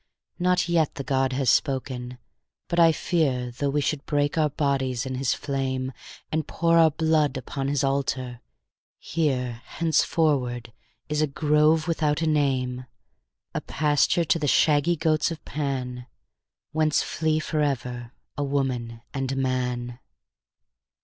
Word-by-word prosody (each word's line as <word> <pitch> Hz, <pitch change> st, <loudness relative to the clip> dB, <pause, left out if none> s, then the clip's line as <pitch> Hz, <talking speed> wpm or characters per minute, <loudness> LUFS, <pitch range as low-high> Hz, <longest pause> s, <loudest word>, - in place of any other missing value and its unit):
Not 180 Hz, 0 st, +2 dB
yet 165 Hz, -3 st, +1 dB
the 140 Hz, -, -4 dB
god 135 Hz, -1 st, +1 dB
has 130 Hz, -2 st, +2 dB
spoken; 130 Hz, -2 st, -1 dB, 0.5 s
but 170 Hz, -, 0 dB
I 165 Hz, -1 st, +7 dB
fear 135 Hz, -8 st, 0 dB
Though 140 Hz, +4 st, -2 dB
we 145 Hz, +1 st, +1 dB
should 145 Hz, 0 st, -1 dB
break 145 Hz, -1 st, +1 dB
our 155 Hz, -2 st, +2 dB
bodies 135 Hz, -3 st, -1 dB
in 130 Hz, -, -4 dB
his 130 Hz, 0 st, 0 dB
flame, 130 Hz, -2 st, -2 dB, 0.4 s
And 160 Hz, 0 st, -1 dB
pour 165 Hz, 0 st, +2 dB
our 160 Hz, -1 st, +7 dB
blood 155 Hz, -3 st, +1 dB
upon 135 Hz, +1 st, -4 dB
his 140 Hz, 0 st, 0 dB
altar, 130 Hz, -3 st, -1 dB, 0.6 s
here 125 Hz, -7 st, -1 dB
Henceforward 140 Hz, -7 st, 0 dB, 0.3 s
is 150 Hz, 0 st, 0 dB
a 155 Hz, -, +3 dB
grove 150 Hz, +2 st, +2 dB
without 155 Hz, -2 st, 0 dB
a -, -, +1 dB
name, 130 Hz, -4 st, 0 dB, 0.7 s
A -, -, -2 dB
pasture 150 Hz, +3 st, +1 dB
to 175 Hz, -2 st, +2 dB
the 145 Hz, -, -1 dB
shaggy 150 Hz, +4 st, +3 dB
goats 155 Hz, -1 st, +1 dB
of 165 Hz, -2 st, -7 dB
Pan, 130 Hz, -4 st, -3 dB, 0.6 s
Whence 155 Hz, -1 st, +2 dB
flee 155 Hz, -1 st, 0 dB
forever 125 Hz, -6 st, -2 dB, 0.2 s
a 145 Hz, -, -2 dB
woman 130 Hz, -5 st, -2 dB
and 135 Hz, -1 st, -2 dB
a -, -, -2 dB
man. 125 Hz, -2 st, -2 dB
140 Hz, 140 wpm, -25 LUFS, 130-155 Hz, 0.7 s, I